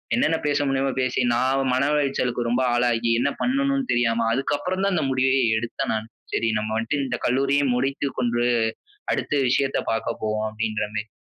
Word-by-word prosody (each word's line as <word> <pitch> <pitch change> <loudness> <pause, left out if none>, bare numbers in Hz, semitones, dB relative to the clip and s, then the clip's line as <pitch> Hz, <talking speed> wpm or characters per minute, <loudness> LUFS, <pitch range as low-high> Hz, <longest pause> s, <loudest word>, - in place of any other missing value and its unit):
என்னென்ன 235 -10 +2
பேச 145 0 +1
முடியுமோ 135 0 +1
பேசி. 130 0 0
நான் 130 +2 +1
மன 130 - +2
உளைச்சலுக்கு 125 -4 0
ரொம்ப 120 +2 +1
ஆளாகி 120 -1 +1
என்ன 140 - +2
பண்ணனும்னு 275 +1 0
தெரியாம, 115 -1 +1
அதுக்கப்புறம் 145 +8 -1
தான் 200 - +1
இந்த 155 -4 0
முடிவயே 130 0 +2 0.2
எடுத்தேன் 120 0 -3
நானு. 110 0 -3 0.3
சரி 115 - +1
நம்ம 110 0 -3
வந்துட்டு 125 +6 -1
இந்த 125 -1 -2
கல்லூரியை 140 +3 +2
முடித்து 135 +3 -1
கொண்டு 120 -1 +1 0.7
அடுத்த - - -2
விஷயத்த 135 +2 +1
பார்க்க 115 - -3
போவோம் 110 0 -1
அப்டின்றமேரி. 110 0 -3
130 Hz, 160 wpm, -23 LUFS, 115-140 Hz, 0.7 s, என்னென்ன